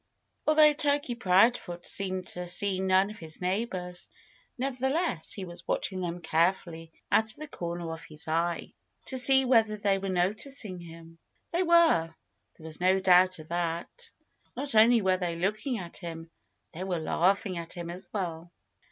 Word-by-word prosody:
Although 305 -1 +6
Turkey 285 -3 0
Proudfoot 190 -4 +2
seemed 185 -2 -2
to 180 0 -5
see 185 +2 0
none 190 +1 +2
of 215 - -12
his 160 -1 -10
neighbors, 180 -2 -3 0.5
nevertheless 265 - -1
he 195 - -3
was 175 0 -11
watching 190 -2 -2
them 175 0 -4
carefully 165 0 0 0.2
out 220 - +4
of 220 - -6
the 305 - -8
corner 170 - -5
of 165 - -9
his 155 0 -9
eye, 165 +1 -1 0.3
to 260 - +1
see 265 +1 +7
whether 225 -4 +3
they 200 -1 +1
were 195 0 -4
noticing 195 +3 -2
him. 165 -1 -13 0.3
They 345 - +1
were. 330 - +4 0.4
There 160 - -15
was 160 +1 -7
no 185 +1 +3
doubt 185 0 +5
of 155 -1 -12
that. 175 - -4 0.5
Not 275 0 -3
only 225 +1 +5
were 185 -1 +2
they 175 -2 -3
looking 210 +8 -1
at 175 -4 -8
him; 165 -2 -8 0.4
they 175 - -6
were 185 -2 -2
laughing 185 +3 0
at 165 -1 -8
him 170 -1 -6
as 180 +1 -8
well. 175 -4 -4
185 Hz, 165 wpm, -28 LUFS, 170-225 Hz, 0.5 s, see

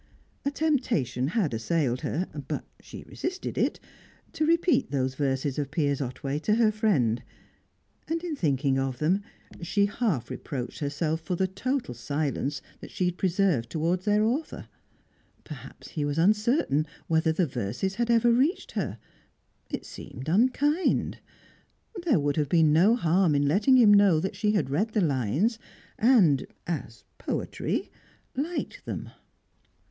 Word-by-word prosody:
A 280 - +1
temptation 245 - 0
had 170 - 0
assailed 125 +2 0
her 180 +4 -1 0.2
(but - - -3 0.2
she - - -10
resisted 370 +1 -5
it) - - 0 0.5
to 310 - 0
repeat 335 - +3
those 130 -2 -1
verses 135 0 -1
of 140 -2 -2
Piers 145 -2 0
Otway 135 +2 -3
to 210 +7 +1
her 225 -2 +4
friend. 150 - +1 0.9
And 330 +1 -2
in 340 -4 -3
thinking 140 - +1
of 135 -2 -2
them, 175 +8 +1 0.4
she 200 +4 +2
half 200 - -1
reproached 130 0 -5
herself 155 +2 -1
for 180 +2 -2
the 190 - +1
total 215 - -2
silence 140 +2 -2 0.2
she 185 - -2
had 180 0 -2
preserved 180 - +1
towards 170 +3 -1
their 210 0 +3
author. 260 +9 -2 0.8
Perhaps 135 -4 -10
he 150 - -3
was 145 +1 -1
uncertain 205 - +2 0.2
whether 160 0 +2
the 170 +3 +1
verses 125 - -3
had 235 +3 -1
ever 235 0 +4
reached 270 +10 +1
her. - - -3 0.7
It - - -4
seemed 130 +3 -9
unkind. 260 - +2 0.9
There 260 - +4
would 145 0 0
have 150 -2 +1
been 160 -3 +4
no 190 +9 +5
harm 175 -5 +2
in 140 0 +2
letting 210 - +4
him 220 -4 +7
know 200 -5 +5
that 190 +4 -3
she 210 -1 +1
had 195 -10 0
read 210 +10 0
the 215 - +2
lines, 155 - +1 0.4
and 205 - +4 0.2
as 125 -10 -5 0.2
poetry - - -3 0.4
liked 315 +6 -3
them. - - -5
170 Hz, 145 wpm, -27 LUFS, 140-220 Hz, 0.9 s, him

